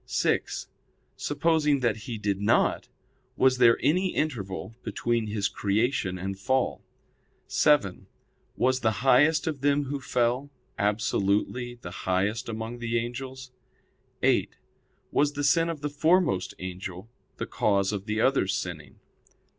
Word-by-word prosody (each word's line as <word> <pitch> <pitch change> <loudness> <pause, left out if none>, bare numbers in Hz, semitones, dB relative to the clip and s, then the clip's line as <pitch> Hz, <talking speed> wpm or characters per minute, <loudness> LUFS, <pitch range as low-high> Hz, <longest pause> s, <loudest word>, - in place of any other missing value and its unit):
(6) - - 0 0.5
Supposing 150 -1 +1
that 120 -3 +2
he 115 +1 -6
did 100 -2 -2
not, 105 - +2 0.5
was 130 -1 +3
there 115 -2 +6
any 180 +6 +2
interval 110 -8 -3
between 120 -2 -1
his 105 -2 0
creation 100 -2 0
and 95 +1 -5
fall? 130 +6 0 0.6
(7) 125 -11 +2 0.5
Was 130 +1 +2
the 110 +1 -1
highest 145 +4 +5
of 150 -5 -3
them 145 +1 +2
who 140 0 -4
fell, 125 +3 0 0.3
absolutely 105 +3 0
the - - -6 0.2
highest 100 +5 0
among 115 +2 -5
the 120 0 -1
angels? 130 +2 -5 0.7
(8) - - +2 0.6
Was 145 0 +2
the 145 - -3
sin 165 +4 +3
of 160 -4 -5
the 150 - -1
foremost 155 - +2
angel 95 +1 -7 0.3
the - - -3
cause 100 -2 +1
of 100 -2 -4
the 110 +1 0
others 110 -8 +2
sinning? 75 -7 -6
120 Hz, 130 wpm, -27 LUFS, 100-140 Hz, 0.7 s, there